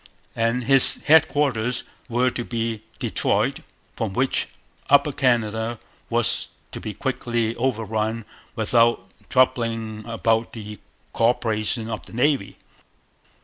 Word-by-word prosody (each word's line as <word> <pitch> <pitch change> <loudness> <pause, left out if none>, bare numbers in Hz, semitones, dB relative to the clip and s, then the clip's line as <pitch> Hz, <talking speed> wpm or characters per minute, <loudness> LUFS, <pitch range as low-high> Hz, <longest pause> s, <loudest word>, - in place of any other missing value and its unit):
And 115 +2 0
his 135 +2 +7
headquarters 145 -6 +2 0.3
were 125 +2 +1
to 120 - -4
be 115 -2 -3 0.2
Detroit, - - 0 0.4
from 110 -4 -3
which 130 +4 0 0.4
Upper 145 +1 +5
Canada 115 -3 0 0.3
was - - +1 0.2
to - - -6
be 105 -2 -6
quickly 120 -3 -2
overrun 115 -2 -2 0.3
without 115 -2 +2 0.3
troubling 115 -4 0
about 115 0 0
the 105 -2 -8 0.3
co 115 - +3
operation 110 -1 -1
of 110 -1 -5
the - - -14
Navy. 125 -3 0
115 Hz, 110 wpm, -23 LUFS, 110-125 Hz, 0.4 s, his